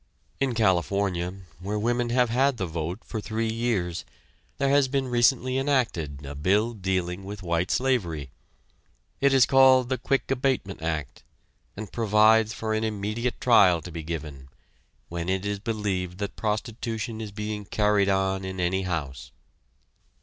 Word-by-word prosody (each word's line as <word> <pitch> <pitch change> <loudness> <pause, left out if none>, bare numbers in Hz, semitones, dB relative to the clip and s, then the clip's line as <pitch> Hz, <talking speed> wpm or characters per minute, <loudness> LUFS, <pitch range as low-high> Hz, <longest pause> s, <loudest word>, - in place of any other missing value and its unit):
In 135 -3 0
California, 95 -2 0 0.2
where 100 +4 -3
women 120 +2 0
have 125 -1 +2
had 135 +2 +2
the 95 - -2
vote 85 +4 -4
for 110 - -5
three 110 +1 -2
years, 110 -8 -1 0.5
there 140 -1 +1
has 140 -1 +4
been 135 0 -1
recently 125 +1 +2
enacted 90 - -1
a 70 - -6
bill 100 +11 +1
dealing 95 -2 -2
with 100 0 -8
white 85 +1 0
slavery. 85 - 0 0.9
It 140 0 +4
is 135 -2 +6
called 130 -2 +5
the 130 - -1
Quick 135 -1 -1
Abatement 125 -9 -1
Act, 80 -4 -3 0.6
and 105 -2 -7
provides 110 0 +4
for 110 -1 -3
an 110 0 0
immediate 110 +3 -2
trial 95 -8 +5
to 90 - -8
be 85 0 -5
given, 75 -4 -6 0.6
when 85 +1 -4
it 95 +1 -1
is 100 -1 -2
believed 100 -5 -2
that 100 0 -4
prostitution 110 0 -3
is 105 -2 -6
being 105 0 -5
carried 105 -1 +2
on 95 0 +1
in 95 0 -5
any 90 +2 +1
house. 80 -8 -4
105 Hz, 150 wpm, -26 LUFS, 90-120 Hz, 0.9 s, is